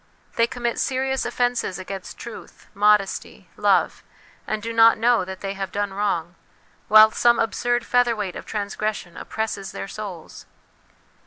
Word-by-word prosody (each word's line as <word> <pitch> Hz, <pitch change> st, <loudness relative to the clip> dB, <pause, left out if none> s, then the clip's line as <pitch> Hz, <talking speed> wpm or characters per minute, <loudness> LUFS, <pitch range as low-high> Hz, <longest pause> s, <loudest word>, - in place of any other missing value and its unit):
They 230 Hz, -, +3 dB
commit 240 Hz, 0 st, -3 dB
serious 265 Hz, 0 st, -1 dB
offences 245 Hz, -6 st, -1 dB
against 190 Hz, 0 st, -7 dB
truth, 235 Hz, -, -11 dB
modesty, 210 Hz, -1 st, +1 dB
love, -, -, +2 dB, 0.5 s
and 215 Hz, -, -1 dB
do 230 Hz, 0 st, -4 dB
not 230 Hz, 0 st, +6 dB
know 235 Hz, -1 st, +3 dB
that 190 Hz, +1 st, -8 dB
they 195 Hz, -1 st, -3 dB
have 195 Hz, -2 st, -5 dB
done 205 Hz, -1 st, -2 dB
wrong, 180 Hz, -4 st, -1 dB, 0.5 s
while 215 Hz, 0 st, +8 dB
some 240 Hz, +1 st, +3 dB
absurd 240 Hz, +1 st, 0 dB
featherweight 230 Hz, -6 st, +1 dB
of -, -, -8 dB
transgres 210 Hz, +1 st, -2 dB
sion 175 Hz, -3 st, -11 dB
oppresses 210 Hz, -3 st, -4 dB
their 95 Hz, 0 st, -5 dB
souls. -, -, -8 dB
215 Hz, 145 wpm, -23 LUFS, 195-235 Hz, 0.5 s, while